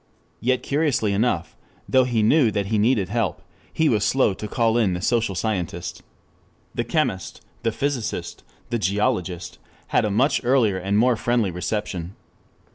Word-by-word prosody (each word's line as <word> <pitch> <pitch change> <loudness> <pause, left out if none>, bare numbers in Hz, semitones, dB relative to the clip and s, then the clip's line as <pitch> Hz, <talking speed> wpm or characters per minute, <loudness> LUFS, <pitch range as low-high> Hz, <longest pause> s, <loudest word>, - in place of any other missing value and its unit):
3 120 - -8
Yet 130 0 +2
curiously 140 -8 +1
enough, 100 -5 0 0.3
though 130 -1 +4
he 120 -3 +1
knew 125 +2 +4
that 100 -2 -1
he 110 +1 0
needed 105 -4 +2
help, 105 -6 -1 0.3
he 160 - +1
was 105 -7 +2
slow 130 -6 +3
to 105 - -6
call 115 +1 +1
in 110 -6 +2
the 90 - -2
social 115 -2 +1
scientist. 90 -4 -3 0.7
The - - -1
chemist, 95 -1 -2 0.2
the 115 - 0
physicist, 135 0 -3 0.3
the 120 - 0
geologist, 95 -3 -1 0.3
had - - +3
a 105 - 0
much 125 +9 +2
earlier 120 -6 +3
and 100 +2 0
more 120 +2 +4
friendly 115 -3 0
reception. 90 -1 -4
110 Hz, 160 wpm, -23 LUFS, 95-120 Hz, 0.7 s, though